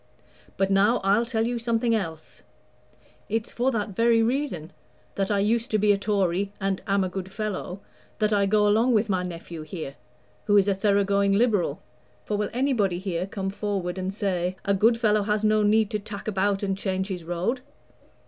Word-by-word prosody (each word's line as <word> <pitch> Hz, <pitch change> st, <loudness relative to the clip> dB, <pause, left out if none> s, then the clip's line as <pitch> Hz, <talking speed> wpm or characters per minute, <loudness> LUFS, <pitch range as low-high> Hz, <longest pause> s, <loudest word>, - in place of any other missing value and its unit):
But 195 Hz, 0 st, +1 dB
now 205 Hz, +5 st, +4 dB
I'll 205 Hz, +4 st, +3 dB
tell 225 Hz, -2 st, 0 dB
you 240 Hz, 0 st, -1 dB
something 230 Hz, 0 st, +1 dB
else. 165 Hz, -7 st, -4 dB, 0.9 s
It's 225 Hz, +1 st, -2 dB
for 245 Hz, +2 st, +1 dB
that 220 Hz, -4 st, -1 dB
very 230 Hz, +3 st, +3 dB
reason 230 Hz, -, -2 dB, 0.4 s
that 195 Hz, -1 st, -1 dB
I 205 Hz, -, +2 dB
used 225 Hz, +5 st, +1 dB
to 215 Hz, -, +2 dB
be 210 Hz, 0 st, +3 dB
a 200 Hz, -, +3 dB
Tory, 200 Hz, -2 st, 0 dB
and 195 Hz, -1 st, -1 dB
am 195 Hz, -1 st, +2 dB
a -, -, 0 dB
good 190 Hz, 0 st, -6 dB
fellow 200 Hz, -2 st, -4 dB, 0.4 s
that 215 Hz, -1 st, +1 dB
I 200 Hz, -1 st, +3 dB
go 210 Hz, +1 st, +3 dB
along 225 Hz, +4 st, +3 dB
with 215 Hz, +1 st, +2 dB
my 185 Hz, -2 st, +1 dB
nephew 170 Hz, -2 st, -7 dB
here, 155 Hz, -3 st, -6 dB, 0.5 s
who 205 Hz, -, +4 dB
is 200 Hz, 0 st, +4 dB
a 200 Hz, -, +3 dB
thorough 200 Hz, +1 st, +2 dB
going 200 Hz, 0 st, +2 dB
Liberal. 200 Hz, -, +1 dB, 0.4 s
For 210 Hz, -, -1 dB
will 205 Hz, 0 st, -1 dB
anybody 235 Hz, -8 st, +1 dB
here 185 Hz, -1 st, -3 dB
come 195 Hz, -1 st, -4 dB
forward 195 Hz, -3 st, -3 dB
and 185 Hz, +1 st, -2 dB
say, 185 Hz, -3 st, -1 dB
'A 200 Hz, -, +2 dB
good 225 Hz, +4 st, +4 dB
fellow 215 Hz, -2 st, +3 dB
has 210 Hz, +1 st, 0 dB
no 215 Hz, 0 st, +3 dB
need 210 Hz, 0 st, +3 dB
to 210 Hz, -, -1 dB
tack 200 Hz, 0 st, -8 dB
about 200 Hz, -1 st, 0 dB
and 195 Hz, -1 st, 0 dB
change 190 Hz, 0 st, -2 dB
his 180 Hz, -3 st, -4 dB
road?' 175 Hz, +10 st, -2 dB
200 Hz, 195 wpm, -25 LUFS, 190-220 Hz, 0.9 s, now